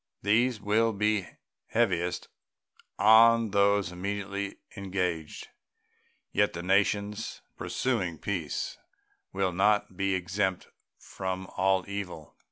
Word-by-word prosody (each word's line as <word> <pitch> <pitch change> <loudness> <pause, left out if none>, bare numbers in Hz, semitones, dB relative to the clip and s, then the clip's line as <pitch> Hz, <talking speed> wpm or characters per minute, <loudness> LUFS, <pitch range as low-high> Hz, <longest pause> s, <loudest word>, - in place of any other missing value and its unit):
These 115 +3 +2
will 110 +2 +2
be 105 -1 0 0.4
heaviest 90 -6 0 0.7
on 115 0 +6
those 100 -1 +3
immediately 100 +2 -4 0.2
engaged. 90 -5 -3 0.8
Yet 105 - +2
the 85 +1 -5
nations 100 +3 0
pursuing 95 -11 -1
peace 85 -5 -3 0.5
will 95 -1 0
not 100 +1 +2
be 95 0 0
exempt 95 +1 -1 0.3
from 95 0 -5
all 95 0 +2
evil. 95 -6 -6
100 Hz, 95 wpm, -28 LUFS, 95-105 Hz, 0.8 s, on